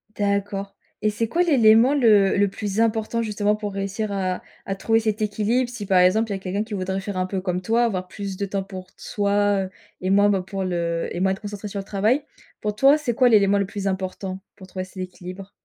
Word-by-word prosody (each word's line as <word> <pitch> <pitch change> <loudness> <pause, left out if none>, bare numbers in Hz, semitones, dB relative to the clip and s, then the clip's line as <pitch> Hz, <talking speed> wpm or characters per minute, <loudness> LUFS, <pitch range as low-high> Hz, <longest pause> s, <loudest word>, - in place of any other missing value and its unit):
D'accord 200 -1 -1 0.3
et 215 - +2
c'est 220 +2 -1
quoi 340 +10 +2
l'élément 245 -5 +5
le 210 -8 +4
le 205 - +4
plus 205 +1 -4
important 225 0 +1
justement 210 -1 0
pour 210 -1 -5
réussir 200 +2 -3
à 185 -2 -2 0.2
à 195 - -2
trouver 225 +3 +2
cet 215 0 -1
équilibre? 215 +4 0
Si 240 -4 -6
par 190 -1 +4
exemple 210 +5 +3
il - - 0
y - - -3
a - - -10
quelqu'un 190 +2 -2
qui 220 0 -9
voudrait 190 0 -2
faire 200 -1 -5
un 185 - +1
peu 190 0 -3
comme 180 -1 -2
toi, 225 +5 +2
avoir 185 -6 -1
plus 195 -1 -6
de 200 - -1
temps 195 0 -3
pour 185 -1 -9
t - - -29
soi, 205 -1 +1
heu, - - -8 0.3
et 185 - -1
moins 200 +1 +5
ben, 195 -2 +2
pour 190 +1 -4
le 170 -2 -1
et - - -4
moins 190 +1 +2
être 190 - -4
concentré 205 0 -6
sur 200 0 -5
le - - -4
travail. 215 +8 +1 0.4
Pour 210 -1 -2
toi, 275 +6 +6
c'est 285 -6 -2
quoi 250 +2 +4
l'élément 200 -2 +4
le 200 - +1
plus 200 -1 -4
important 190 0 -3 0.2
pour 190 - -12
trouver 185 0 -5
cet 185 - -17
équilibre? 185 +1 -8
200 Hz, 240 wpm, -23 LUFS, 190-215 Hz, 0.4 s, toi